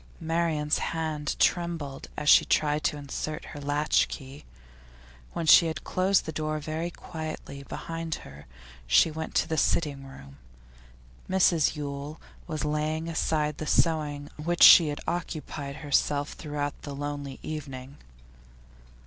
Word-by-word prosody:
Marian's 160 -2 0
hand 155 -3 -2
trembled 165 -6 0
as 150 - -4
she - - +8
tried 150 0 +1
to 150 - +1
insert 145 +2 -5
her 145 - -9
latch 145 +1 +2
key. 135 +1 -9 0.9
When 170 - -3
she 165 +2 +8
had 160 -3 -4
closed 185 +1 +1
the 160 - -4
door 155 0 -2
very 155 +2 -3
quietly 155 -5 -7
behind 165 +3 -5
her 70 +1 -13 0.4
she 65 - +5
went 160 +1 -6
to - - +2
the 160 -1 -2
sitting 145 -4 0
room; 70 - -13 0.9
Mrs 180 -4 +3
Yule 145 +1 -6 0.3
was 155 -1 -3
just - - -1
laying 155 +2 -1
aside 150 -2 -1
the 155 - -4
sewing 150 -4 +1
on 150 - -7
which 175 0 +3
she 165 - +10
had 145 -1 -4
occupied 155 -4 -4
herself 145 0 0
throughout 145 -1 -4
the 140 -1 -7
lonely 145 -1 -5
evening. 140 -3 -7
150 Hz, 140 wpm, -27 LUFS, 145-160 Hz, 0.9 s, she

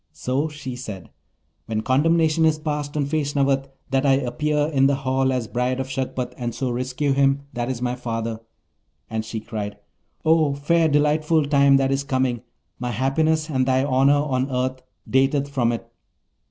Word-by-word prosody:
So 135 +5 -1
she 145 -4 -7
said, 105 -10 -8 0.6
'When 110 -1 -1
condemnation 160 +5 +2
is 160 -1 +3
passed 150 -1 -3
on 145 - +1
Feshnavat, 140 -2 0 0.2
that 135 0 +2
I 140 -2 +4
appear 145 +3 0
in 135 -1 +4
the 140 - +2
hall 130 -1 0
as 125 -3 -1
bride 125 +2 -1
of 135 0 -4
Shagpat, 130 -1 -3
and 120 -2 -3
so 125 +1 -2
rescue 130 +3 -1
him 135 0 +2
that 120 +1 -2
is 125 -2 -3
my 125 0 0
father.' 115 -2 -4 0.7
And 110 -1 -2
she 110 0 -5
cried, 105 -2 -5 0.5
'Oh, 155 -3 +3
fair 160 +3 +2
delightful 150 +1 +2
time 140 -1 +5
that 135 0 +1
is 135 0 0
coming! 130 -3 0 0.4
my 125 0 -3
happiness 155 +6 +1
and 130 -4 0
thy 130 0 +3
honour 135 +1 +4
on 130 -2 -1
earth 130 0 -2 0.3
dateth 135 +2 +2
from 125 -4 +1
it. 115 - -5
135 Hz, 170 wpm, -23 LUFS, 125-145 Hz, 0.7 s, time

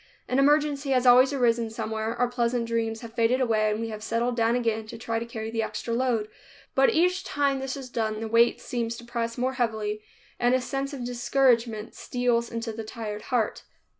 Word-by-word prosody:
An 255 - +1
emergency 290 0 +3
has 255 -1 +2
always 255 +2 +7
arisen 235 -4 +1
somewhere, 220 0 -3
our 245 +1 +2
pleasant 240 -1 0
dreams 225 -1 -2
have 230 -2 -9
faded 235 +2 +2
away, 220 -4 +2
and 210 +1 -1
we 230 0 -3
have 215 -1 -6
settled 235 +2 -1
down 230 0 +2
again 225 -3 -1
to 230 - -8
try 225 0 -2
to 235 - -6
carry 220 -1 -5
the 225 0 -1
extra 220 +1 -3
load; 235 -3 +1 0.5
but 270 0 +5
each 360 +3 +2
time 280 -4 0
this 265 0 -4
is 270 -2 -7
done, 220 -3 -2
the 225 - -3
weight 230 +1 +4
seems 235 -1 -3
to 235 - -10
press 235 -1 -3
more 255 +2 0
heavily 220 -4 -1 0.4
and 245 +1 +3
a - - +2
sense 275 +2 -3
of 265 -4 -5
discouragement 240 -3 +1
steals 240 -1 0
into 230 -1 -4
the 225 +1 -5
tired 215 -1 -6
heart. 240 -4 0
235 Hz, 205 wpm, -26 LUFS, 225-255 Hz, 0.5 s, always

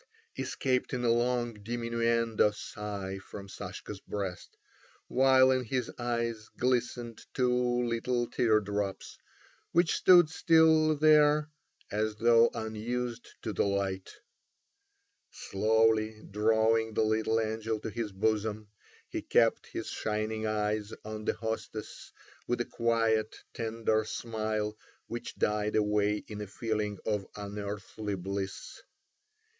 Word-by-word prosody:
escaped 130 -1 -1
in 125 -1 -2
a 115 - +4
long 120 0 +1
diminuendo 115 0 +1
sigh 100 -2 -6
from 100 +1 -10
Sashka's 95 - -7
breast, 95 -3 -5 0.5
while 130 0 +5
in 130 -1 +1
his 125 +2 -2
eyes 115 -2 -2
glistened 120 -2 -1
two 125 -1 +2
little 120 +1 0
tear 115 -2 +3
drops, 100 -1 -4 0.5
which 170 0 +4
stood 175 -3 +7
still 160 -2 +5
there 150 0 +5 0.4
as 110 +1 0
though 115 +1 +5
unused 115 +2 -3 0.2
to 110 - -3
the - - +1
light. 95 -1 -2 1.2
Slowly 110 +1 +1
drawing 110 +1 +2
the 110 - +3
little 110 +1 +1
angel 110 0 -2
to 110 - -4
his 115 -2 -3
bosom, 105 +1 -1 0.4
he - - -4
kept - - +2
his - - -5
shining 110 0 -2
eyes 105 0 -1
on 110 0 -6
the - - +2
hostess, 110 -1 -5 0.4
with 120 - 0
a 120 - 0
quiet, 115 -2 +1 0.2
tender 110 -1 0
smile 110 -2 -2 0.3
which 120 0 -6
died 105 0 0
away 105 0 +2
in 105 -1 -6
a 105 - -5
feeling 105 0 -2
of 105 -3 -1
unearthly 105 0 -5
bliss. 95 +1 -5
110 Hz, 120 wpm, -30 LUFS, 105-120 Hz, 1.2 s, stood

